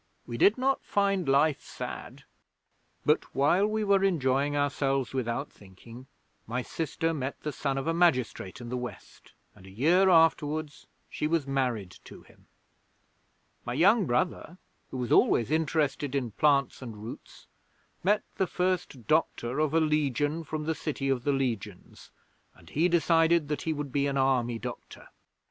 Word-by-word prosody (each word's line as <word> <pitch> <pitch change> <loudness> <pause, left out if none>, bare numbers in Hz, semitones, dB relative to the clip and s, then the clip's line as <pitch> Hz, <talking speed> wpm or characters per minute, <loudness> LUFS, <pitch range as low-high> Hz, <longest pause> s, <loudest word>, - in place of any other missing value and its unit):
We 120 - -6
did 200 - +4
not 265 +1 0
find 195 -5 0
life 140 +2 +3
sad. - - -8 0.8
'But - - +1
while 175 +9 +3
we 215 0 -1
were 200 -1 +3
enjoying 145 -5 +1
ourselves 135 -2 0
without 130 +2 -3
thinking, 115 +6 -14 0.4
my 120 +3 -2
sister 165 +3 -2
met 140 -3 -4
the 150 - -2
son 135 -2 -2
of 135 - -3
a 165 - 0
magistrate 130 - +1
in 120 -1 -8
the 125 - -2
West 125 0 -9 0.2
and 95 - -16
a - - -11
year 165 - +3
afterwards 155 -3 +2 0.2
she 150 - -3
was 160 -2 0
married 125 -9 -2
to - - -12
him. - - -23 1.2
My 120 - -4
young 195 - +4
brother, 165 +7 -1 0.3
who 130 - -6
was 125 -2 -3
always 120 +3 +3
interested 150 -3 0
in 125 -5 -1
plants 140 +4 +2
and 115 -4 -8
roots, 110 +3 -10 0.6
met 205 +3 +2
the 190 - +1
First 180 -10 -2
Doctor 150 -4 0
of 155 -2 +1
a 165 - +3
Legion 150 0 0
from 155 0 -4
the 160 +1 -1
City 145 -3 -3
of 125 -2 -1
the 145 - +3
Legions, 115 -8 -4 0.5
and - - -18
he 165 +5 +2
decided 165 -2 +3
that 150 - -2
he 160 - -2
would 145 -3 -4
be 140 +1 +1
an 140 -1 -1
Army 125 -3 +1
doctor. - - -9
145 Hz, 160 wpm, -28 LUFS, 130-165 Hz, 1.2 s, did